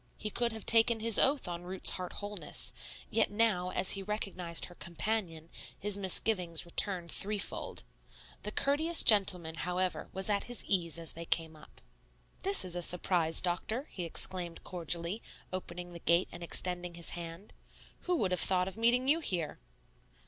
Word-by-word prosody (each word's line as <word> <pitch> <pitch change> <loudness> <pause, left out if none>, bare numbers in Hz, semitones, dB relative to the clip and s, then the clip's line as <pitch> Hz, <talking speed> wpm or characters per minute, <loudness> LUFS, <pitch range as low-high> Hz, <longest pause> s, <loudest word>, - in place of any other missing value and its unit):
He 215 - -5
could 240 +2 0
have 220 -2 -9
taken 225 0 +4
his 225 -1 +3
oath 275 -5 +4
on 175 -1 -5
Ruth's 185 +1 +2
heart 180 -1 -5
wholeness, 205 0 -2 0.4
yet 225 - +2
now, 205 -4 0
as 185 - +4
he 195 - +1
recognized 190 -4 -2
her 175 - -13
companion, 170 -2 -5 0.3
his 205 0 0
misgivings 185 -3 +1
returned 175 0 0
threefold. 205 0 -3 0.6
The 210 - -4
courteous 315 +8 +2
gentleman, 185 -6 +4
however, 180 +2 -3
was 190 0 -4
at 205 -1 0
his 245 -2 -3
ease 170 -5 +5
as 165 -1 -3
they 170 +1 -8
came 160 -1 -1
up. 150 - -17 0.6
"This 390 - +2
is 180 -1 -5
a 175 - -3
surprise, 175 -2 +1
Doctor," 215 - -2
he 180 - -6
exclaimed 170 +1 +1
cordially, 170 +4 0 0.3
opening 175 -1 -7
the 170 - -9
gate 170 +2 +2
and - - -10
extending 175 0 +1
his 170 -1 +1
hand. 170 +3 -8 0.5
"Who 360 - +1
would 200 - -1
have 180 - +1
thought 180 -1 +2
of 190 - -8
meeting 240 +3 +2
you 305 +4 +3
here?" 175 - -2
185 Hz, 165 wpm, -31 LUFS, 170-215 Hz, 0.6 s, ease